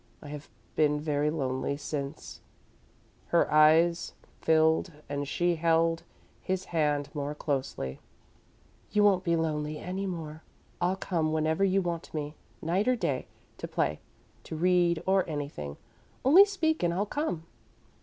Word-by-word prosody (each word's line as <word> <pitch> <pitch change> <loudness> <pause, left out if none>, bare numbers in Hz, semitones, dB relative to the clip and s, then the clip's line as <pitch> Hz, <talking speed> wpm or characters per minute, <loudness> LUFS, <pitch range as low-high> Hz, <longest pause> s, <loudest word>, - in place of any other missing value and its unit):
I 145 - -10
have 150 0 -8 0.3
been 150 -1 +3
very 150 -1 0
lonely 135 -2 -2
since 145 0 -5 0.4
" - - -34 0.2
Her 170 -2 +2
eyes 160 +3 +5 0.3
filled 160 +2 +3 0.2
and 145 0 -3
she 175 +3 +1
held 165 0 +2 0.4
his 190 0 -2
hand 150 -3 +1
more 145 -1 -3
closely. 130 - -3 0.9
"You 210 0 +3
won't 195 -3 +4
be 170 -2 +2
lonely 155 -2 -1
any 190 +4 -4
more. 160 -4 -6 0.4
I'll 180 +2 +2
come 165 -5 -1
whenever 160 +3 +1
you 195 0 +3
want 170 -2 -4
me, 150 -1 -3 0.3
night 180 +7 +1
or 255 - +4
day, 140 - -2 0.3
to - - -4
play, 75 +1 -1 0.5
to - - -6
read 175 0 +2
or 190 0 +3
anything. 140 - -5 0.5
Only 345 +10 +9
speak, 340 -6 0
and 175 - +2
I'll 190 +4 0
come." 210 - -3
160 Hz, 145 wpm, -29 LUFS, 150-180 Hz, 0.9 s, Only